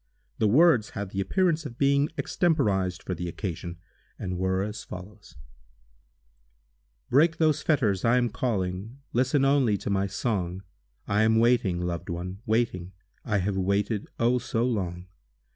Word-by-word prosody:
The 110 - +3
words 135 -1 +5
had 100 -2 -4
the 100 - -2
appearance 170 - +1
of 125 -6 -8
being 140 +1 +3
extemporized 100 - 0
for 90 - -3
the 90 0 -4
occasion, 85 -1 -5 0.4
and 90 -1 -4
were 95 +1 +1
as 105 0 -5
follows: 90 -1 -11 1.8
Break 160 +5 +4
those 155 -3 +2
fetters—I 115 - +2
am 120 -1 +2
calling— 100 0 -2 0.2
Listen 130 +3 +2
only 135 -7 +3
to 100 - -4
my 100 0 +1
song! 95 -3 -2 0.4
I 100 +2 +2
am 110 0 +4
waiting—loved 95 -8 +1
one—waiting! 95 +2 -2 0.3
I 105 -3 0
have 100 -1 -1
waited—oh, 105 +5 0
so 115 0 -1
long! 90 -7 -2
105 Hz, 130 wpm, -27 LUFS, 95-125 Hz, 1.8 s, words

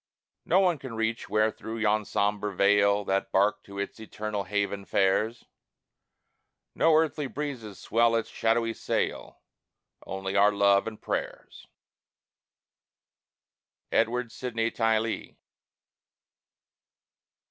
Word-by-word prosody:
No 190 +3 +4
eye 175 -3 +1
can 130 -4 -8
reach 115 +1 -2
where 110 +1 +2
through 110 +1 -7
yon 110 -1 +1
sombre 105 -1 -1
veil 100 +1 +3
That 95 0 -1
bark 100 +2 +2
to 100 0 -11
its 100 +2 -4
eternal 105 -2 -4
haven 100 0 -2
fares; 100 +5 +1 1.3
No 165 -1 +4
earthly 155 -2 +1
breezes 130 -8 -5
swell 115 0 +2
its 115 - 0
shadowy 115 0 0
sail: - - -3 0.7
Only 95 0 -4
our 100 +1 +5
love 100 0 +3
and 110 -1 -6
prayers. - - -5 2.2
EDWARD 120 +1 +1
SYDNEY 115 -2 -2
TYLEE. 115 -1 -1
110 Hz, 105 wpm, -27 LUFS, 100-115 Hz, 2.2 s, our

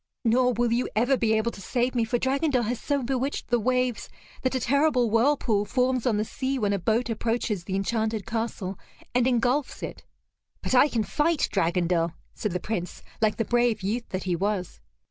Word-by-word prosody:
Nor 250 +2 +3
will 240 0 +1
you 245 +2 0
ever 245 +5 +3
be 225 -3 +1
able 220 +2 +1
to 200 - -11
save 245 +5 0
me, 235 -2 +1
for 240 +2 0
Dragondel 265 0 +1
has 235 +2 -2
so 285 -2 -1
bewitched 265 +2 -2
the 240 -1 +3
waves 250 0 0 0.3
that 260 0 0
a - - +1
terrible 260 -2 +2
whirlpool 230 -3 +2
forms 255 +2 0
on 220 -4 +2
the 215 - 0
sea 265 +4 -2
when 205 -4 +1
a 200 - 0
boat 225 +6 +1
approaches 225 -4 -1
the 190 - -3
enchanted 220 +1 -1
castle, 225 -4 -3 0.3
and 250 0 +3
engulfs 255 +3 0
it." - - -6 0.6
"But - - -1
I 260 +3 +7
can 230 -6 0
fight 300 - +1
Dragondel," 175 -2 +1 0.2
said 210 - -3
the 180 - -1
Prince, 180 -3 -4 0.2
like 215 -1 +2
the 225 - 0
brave 240 -3 +1
youth 230 +5 -2
that 185 0 -3
he 180 -2 0
was. 195 0 -2
235 Hz, 195 wpm, -26 LUFS, 210-255 Hz, 0.6 s, I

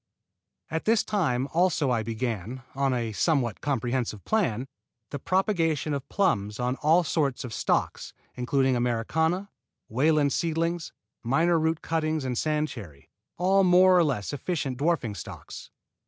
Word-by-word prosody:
At 160 0 -2
this 225 0 +3
time 135 -11 0
also 165 -5 +2
I 120 -2 +1
began, 115 +1 -4
on 135 0 +1
a 120 -3 -1
somewhat 125 -1 0
comprehensive 120 -5 -2
plan, 135 - 0 0.4
the 140 - -4
propagation 165 - 0
of 140 0 -5
plums 105 - 0
on 125 +1 0
all 160 +4 +3
sorts 145 -5 -1
of 125 -3 -7
stocks, - - -1 0.2
including 130 +1 +1
Americana, 160 - 0 0.4
Wayland 145 +4 +2
seedlings, 165 0 -1 0.3
Miner 165 +8 +2
root 160 0 0
cuttings 155 -3 -1
and 125 -1 -2
sand 155 +3 0
cherry, 80 - -11 0.3
all 190 +2 +3
more 185 0 +6
or 175 - +5
less 135 -7 -2
efficient 140 -3 -3
dwarfing 145 -8 0
stocks. 95 - -9
145 Hz, 140 wpm, -27 LUFS, 125-165 Hz, 0.4 s, more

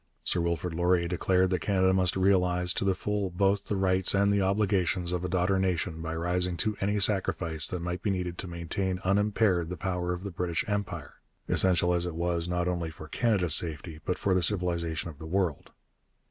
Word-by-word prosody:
Sir 85 - +1
Wilfrid 85 +1 -2
Laurier 85 +1 +1
declared 90 +1 +1
that 90 - +1
Canada 95 +1 +2
must 95 -2 +2
realize 90 -2 +2
to - - -2
the 95 -1 +1
full 105 0 -2
both 100 +3 0
the 105 - -1
rights 95 0 +3
and 100 +1 +3
the 100 - +2
obligations 95 -3 +1
of 90 -1 -2
a 90 - -2
daughter 95 +1 +1
nation 90 -3 -1
by 80 0 -4
rising 90 +1 -1
to 110 +2 0
any 100 +1 0
sacrifice 90 -6 +2
that 90 - -4
might 90 +1 -4
be 105 - -1
needed 90 -2 -3
to 95 - -5
maintain 90 +2 -3
unimpaired 100 -3 +1
the 90 - -5
power 90 +1 -2
of 90 +1 -4
the 100 - -5
British 85 -1 -2
Empire, 105 -2 -4 0.3
essential 90 -1 +3
as 85 0 0
it 85 - -5
was 85 0 -1
not 90 0 -1
only 85 -2 -2
for 80 0 -11
Canada's 95 -2 +2
safety 80 -1 +1
but 90 - -2
for 95 - 0
the 90 - +2
civilization 85 -4 0
of 75 - -17
the 80 - -8
world. 90 -3 -1
90 Hz, 200 wpm, -28 LUFS, 85-95 Hz, 0.3 s, rights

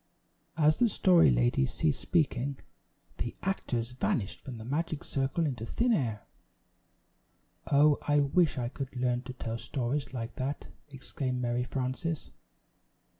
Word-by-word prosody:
As 155 -1 +4
the 240 - +4
Story 180 - +5
Lady - - +3
ceased 75 - 0
speaking, 140 -4 +1 0.6
the 120 - -3
actors 125 -11 -1
vanished 125 -4 -1
from 125 -3 -7
the 110 - -8
magic 155 +3 -2
circle 135 +5 0
into 125 -7 -3
thin 235 - +1
air. 115 - -1 1.5
"Oh, 145 +1 +5
I 145 0 +2
wish 145 +3 +3
I 120 -2 -1
could 135 0 -6
learn 125 -1 0
to 130 0 -8
tell 115 -2 -4
stories 135 +3 -2
like 115 -3 -5
that!" 135 +2 -3 0.3
exclaimed 130 -1 -3
Mary 120 0 0
Frances. 135 +5 -3
130 Hz, 135 wpm, -30 LUFS, 120-150 Hz, 1.5 s, Story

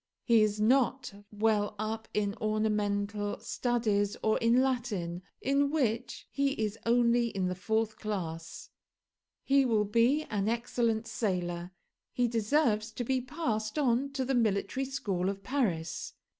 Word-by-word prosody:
He 230 -3 +5
is 210 0 +1
not 250 +1 +2 0.2
well 210 -1 +1
up 220 +1 -3
in 205 -1 0
ornamental 210 -1 0
studies 215 -5 0
or 215 - +2
in 235 +3 +4
Latin 210 -10 -2 0.2
in 280 +1 +2
which 245 -5 -1
he 275 -1 +1
is 215 -3 -2
only 235 0 +4
in 190 -5 -1
the - - -1
fourth 220 +3 -1
class. 165 -6 -5 0.7
He 275 0 +4
will 220 -5 +2
be 235 +8 +3
an 205 -6 -1
excellent 235 -1 0
sailor. 180 -6 -2 0.4
He 245 -1 +2
deserves 225 -1 +1
to 245 - -3
be 260 +2 0
passed 240 -5 -3
on 270 -1 +2
to 265 -2 -1
the 270 - 0
Military 230 +3 +1
School 195 -9 -2
of 195 0 -5
Paris. 190 - -1
220 Hz, 140 wpm, -30 LUFS, 205-245 Hz, 0.7 s, He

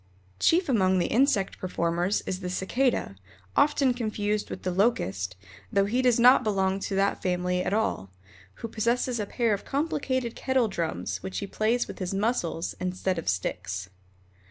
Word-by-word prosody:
Chief 350 - +3
among 190 -8 +3
the 175 - +2
insect 230 -6 +2
performers 175 +1 0
is 185 - -3
the 180 -1 -4
Cicada, 190 - 0 0.4
often 285 -3 +3
confused 215 -3 -2
with - - -7
the 185 - -1
Locust, 100 - 0 0.4
though 195 0 +3
he 240 +6 +1
does 245 -2 +3
not 250 +2 +7
belong 195 -2 +1
to 195 - -3
that 195 +1 +1
family 180 0 0
at - - -2
all, 205 - 0 0.6
who - - -2
possesses 235 +2 0
a 205 - -2
pair 230 -1 +1
of 200 - -3
complicated 270 -5 -1
kettle 260 -3 +1
drums, 125 - -3
which 95 0 -5
he - - -2
plays 220 +4 0
with - - -9
his 185 0 -3
muscles 195 -6 -1
instead 185 0 -1
of - - -2
sticks. 95 0 -3
200 Hz, 165 wpm, -27 LUFS, 180-240 Hz, 0.6 s, not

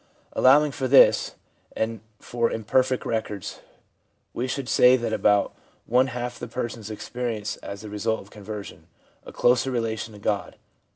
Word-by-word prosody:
Allowing 145 +3 +5
for 135 -1 -3
this, 135 +1 +5 0.4
and 110 0 -2 0.2
for 120 -1 -1
imperfect 130 +4 0
records, 110 -4 -3 0.7
we 125 - -2
should 130 0 -3
say 125 +2 +6
that 120 -2 -3
about 105 -2 +2 0.3
one 125 +2 +3
half 120 -1 -5
the 120 - -6
persons 115 -2 -5
experience, 110 0 -4
as 100 0 -8
the 110 - -8
result 110 +2 -1
of 100 - -14
conversion, 105 -1 -9 0.4
a - - -8
closer 125 +2 +2
relation 115 -3 -3
to - - -12
God. 100 0 -2
115 Hz, 150 wpm, -25 LUFS, 105-125 Hz, 0.7 s, say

